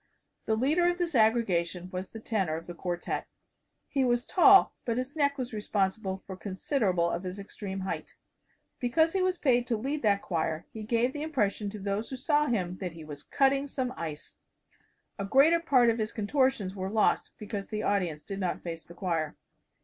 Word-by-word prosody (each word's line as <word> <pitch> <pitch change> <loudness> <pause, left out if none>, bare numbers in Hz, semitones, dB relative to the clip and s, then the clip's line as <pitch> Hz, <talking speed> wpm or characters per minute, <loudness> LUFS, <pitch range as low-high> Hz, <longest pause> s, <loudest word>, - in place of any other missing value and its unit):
The 220 - +3
leader 305 +10 +3
of 350 - -1
this 350 -2 -1
aggregation 185 -7 +2
was 185 +1 -4
the 225 - -9
tenor 195 -8 -1
of 165 +1 -6
the 175 - -7
quartette. 175 0 -3 0.6
He 275 -2 +1
was 240 -1 +1
tall, 390 +1 +6
but 230 -1 -1
his 255 +3 -3
neck 285 -2 +2
was 250 -2 -4
responsible 195 -2 -1
for 190 - -7
considerable 190 - 0
of 170 - -2
his 185 0 -5
extreme 195 -1 -6
height. 190 - -5 0.6
Because 320 +7 +2
he 385 - +1
was 370 -1 +1
paid 245 -5 +2
to 230 - 0
lead 280 +7 -2
that 200 -2 +2
choir 160 -2 -2
he 220 - -6
gave 235 +4 +1
the 295 - -5
impression 215 -9 0
to 210 - -7
those 200 +3 -2
who 265 - -4
saw 295 +3 +2
him 185 -7 -1
that 180 -3 -5
he 165 -1 -10
was 145 -2 -8
cutting 275 +1 +2
some 255 -2 -2
ice. 155 -3 -6 0.8
A - - -1
greater 285 +10 +5
part 255 -8 +4
of 230 - -3
his 215 0 -1
contortions 225 -3 +1
were 190 0 -3
lost 215 +1 +2
because 205 -2 -5
the 215 -1 -3
audience 175 -7 0
did 195 -1 -6
not 185 -2 -2
face 165 -2 -5
the 170 - -14
choir. 165 -5 -2
215 Hz, 195 wpm, -29 LUFS, 185-265 Hz, 0.8 s, tall